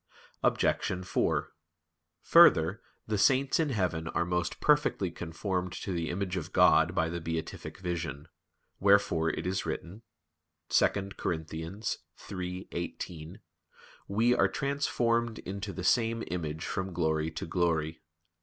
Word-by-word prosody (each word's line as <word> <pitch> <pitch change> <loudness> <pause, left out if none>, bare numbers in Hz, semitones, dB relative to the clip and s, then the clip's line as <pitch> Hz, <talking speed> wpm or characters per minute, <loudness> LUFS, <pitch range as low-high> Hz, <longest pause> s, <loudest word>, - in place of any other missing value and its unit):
Obj. 90 0 +1
4: 90 - 0 0.7
Further, 80 +6 +6 0.2
the 105 -2 -1
saints 135 +7 +3
in 160 -2 +2
heaven 90 -9 -1
are 85 - 0
most 90 -1 -1
perfectly 150 - +2
conformed 90 +2 -3
to 95 - -4
the 85 -2 -2
image 95 +1 -2
of 85 - -5
God - - +5
by 80 - +2
the 85 +1 -4
beatific 80 0 -5
vision; 85 -5 -4 0.5
wherefore 100 -5 +4
it - - -3
is 95 +1 -1
written 85 +6 -5 0.7
(2 - - +5 0.3
Cor. - - 0
3:18): 85 0 -6 0.7
"We... 115 +5 +3
are 125 - +4
transformed 120 -5 0
into 100 +2 -5
the 95 - -6
same 115 +4 +2
image 80 -3 -3
from 95 -1 -3
glory 80 -2 0
to 80 - -5
glory." 80 -2 0
90 Hz, 125 wpm, -30 LUFS, 80-100 Hz, 0.7 s, Further